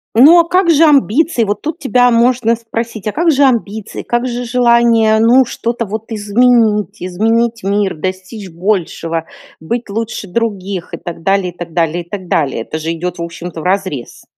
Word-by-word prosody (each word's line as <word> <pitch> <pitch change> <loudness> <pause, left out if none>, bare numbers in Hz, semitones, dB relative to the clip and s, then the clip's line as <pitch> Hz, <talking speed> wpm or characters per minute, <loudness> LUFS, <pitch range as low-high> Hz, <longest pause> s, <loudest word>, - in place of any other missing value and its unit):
Ну, 300 +9 +8
а - - -1
как 360 +1 +1
же 325 -1 +5
амбиции? 285 -2 +3
Вот 205 0 -2
тут 315 +3 -4
тебя 250 -3 +3
можно 235 0 +2
спросить: 225 -2 -5
"А 210 - -2
как 335 +2 +2
же 285 -1 +3
амбиции?" 220 -5 -1
Как 240 +1 -1
же 245 0 -4
желание, 235 -2 +3
ну, 245 +4 +5
что-то 235 0 -3
вот 220 +3 -6
изменить 215 -1 +1
изменить 225 +5 0
мир, 200 0 0
достичь 185 +4 -6
большего, 165 -2 -2 0.4
быть 235 +8 -4
лучше 220 0 -4
других 195 -3 -3
и - - -3
так 170 -1 -8
далее 195 -1 0
и - - -30
так 175 -1 -7
далее 170 0 0
и 170 - -28
так 190 -2 -6
далее. 135 -8 0
Это 155 - -5
же 160 +1 -3
идет, 175 +1 -4
в - - -3
общем-то, 170 0 -7
вразрез. 185 -7 -3
220 Hz, 180 wpm, -15 LUFS, 185-240 Hz, 0.4 s, Ну